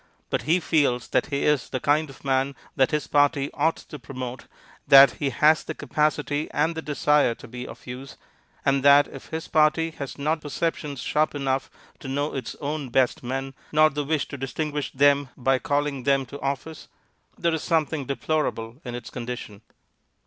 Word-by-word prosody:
But - - 0
he 175 +3 +5
feels 145 -8 +1
that - - +1
he 140 -2 -2
is 150 -4 +1
the 130 - -2
kind 150 +3 +2
of 135 - -14
man 135 +1 +1 0.2
that 130 -1 +3
his 150 -1 -1
party 145 -1 +2
ought 160 +3 +1
to 150 - -10
promote, 125 0 -7 0.4
that 135 -2 +9
he 140 - +1
has 155 +4 +4
the - - -6
capacity 150 0 -1
and 155 +3 +1
the 160 - -5
desire 150 -4 +2
to - - -13
be 125 +1 -7
of - - -12
use, 130 +2 -8 0.5
and 135 0 +3
that 140 +1 +6
if 135 - -11
his 160 0 -5
party 160 +1 +3
has 140 -4 -7
not 155 +2 -1
perceptions 150 -3 -3
sharp 150 +5 0
enough 135 -1 -1 0.3
to - - -9
know 145 +3 -1
its 130 -4 -5
own 145 -2 -4
best 130 +1 +2
men, 135 +2 -4 0.2
nor 155 0 +5
the 145 +1 -2
wish 150 +1 -1
to 140 - -6
distinguish 145 +3 -3
them 140 0 +3
by 130 0 +2
calling 145 -1 -1
them 135 +1 +2
to 140 +3 -10
office, 140 +3 -4 0.5
there 170 -1 +1
is 160 - -1
something 160 -3 0
deplorable 140 -4 -2
in 120 -2 -5
its 120 - -8
condition. 120 -4 -6
140 Hz, 185 wpm, -25 LUFS, 135-150 Hz, 0.5 s, that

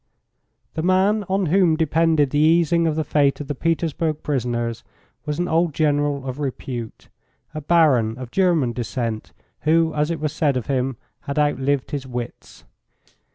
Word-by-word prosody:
The 160 - -3
man 190 +4 +2
on 190 0 +1
whom 170 -1 +3
depended 160 -2 +2
the 145 - +1
easing 165 +1 +3
of 155 - 0
the 155 - 0
fate 140 -1 +1
of 145 - -6
the 145 - -2
Petersburg 160 0 -1
prisoners 120 -4 -2 0.4
was 150 0 -2
an 175 +1 -1
old 165 -2 +1
General 145 -2 +1
of 130 +1 -5
repute 125 -4 -5 0.5
a 155 - -5
baron 135 -9 +3
of 125 -2 -8
German 170 -10 +2
descent, 115 -2 -4 0.3
who, 160 +1 +2
as 150 +1 0
it 165 -2 -2
was 155 -1 -2
said 145 -4 +1
of 125 - -3
him, 130 -2 -1 0.3
had 140 - -3
outlived 145 -2 0
his 140 -2 -4
wits. 125 -1 -7
150 Hz, 160 wpm, -22 LUFS, 130-165 Hz, 0.5 s, whom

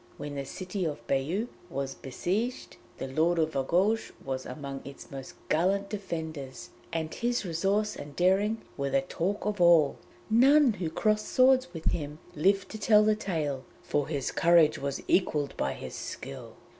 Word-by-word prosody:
When 145 0 -6
the 140 -1 -4
city 185 +5 -4
of 145 -8 -3
Bayeux 155 - 0 0.2
was 135 0 -3
besieged, 200 - -3 0.2
the - - -4
Lord 160 +6 +2
of 160 -1 +1
Argouges 185 +11 +1
was 130 -1 -3
amongst 135 +1 -6
its 140 - -11
most 135 -1 -8
gallant 195 +5 +1
defenders, 160 - -5 0.2
and 160 -1 -2
his 240 -2 -1
resource 195 +5 0
and 145 -1 -9
daring 195 +6 +2
were 140 -1 -1
the 135 0 +2
talk 190 +9 -2
of 205 -3 -1
all. 170 -4 +6 0.3
None 265 +3 +6
who 180 -5 -3
crossed 215 +6 +1
swords 255 -5 +4
with 165 -2 -8
him 150 -2 -4 0.2
lived 195 +5 +2
to 220 - -7
tell 210 0 +5
the 215 0 +3
tale, 155 -10 -2 0.2
for 145 -1 0
his 140 -4 -2
courage 170 -2 +4
was 140 0 -3
equalled 150 -6 +1
by 65 - -1
his - - -8
skill. 70 - -7
165 Hz, 165 wpm, -29 LUFS, 140-205 Hz, 0.3 s, all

